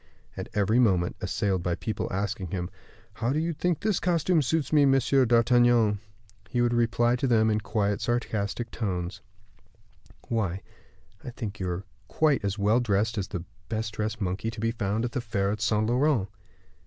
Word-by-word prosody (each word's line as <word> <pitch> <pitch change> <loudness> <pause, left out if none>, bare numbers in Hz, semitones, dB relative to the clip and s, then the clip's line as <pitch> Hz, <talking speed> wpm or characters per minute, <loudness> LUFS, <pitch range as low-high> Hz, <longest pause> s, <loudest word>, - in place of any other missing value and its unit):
At - - -6
every 105 +3 +3
moment 95 -7 +2
assailed 95 -3 0
by 85 0 -1
people 110 - -3
asking 100 0 -2
him, 90 +1 -4 0.4
"How 115 +3 -1
do 145 - 0
you 165 +2 0
think 175 +2 -1
this 215 -4 +1
costume 175 -1 +2
suits 150 +1 -1
me, 150 -2 +6
Monsieur 135 -1 +4
d'Artagnan?" 120 -2 +4 0.5
he 125 - -1
would 120 0 +2
reply 120 +1 +2
to 135 - 0
them 110 -2 +3
in 105 0 0
quiet, 100 0 -1
sarcastic 115 -1 -2
tones, 90 -5 -3 1.1
"Why, 100 -5 -1 0.6
I - - -6
think 110 -5 -6
you 95 -1 -2
are 90 +2 -3 0.2
quite 150 -1 +2
as 100 +1 -1
well 105 +4 +3
dressed 110 -1 +1
as 100 -3 -2
the 90 -4 -5 0.3
best 110 -1 -2
dressed 110 +1 -3
monkey 95 +2 -2
to 115 -1 -8
be 115 +1 0
found 110 0 -1
in 120 - -3
the 130 - -1
fair 100 -4 -1
at 105 +1 -4
Saint 110 -1 +2
Laurent." 125 -2 +2
110 Hz, 180 wpm, -27 LUFS, 100-120 Hz, 1.1 s, me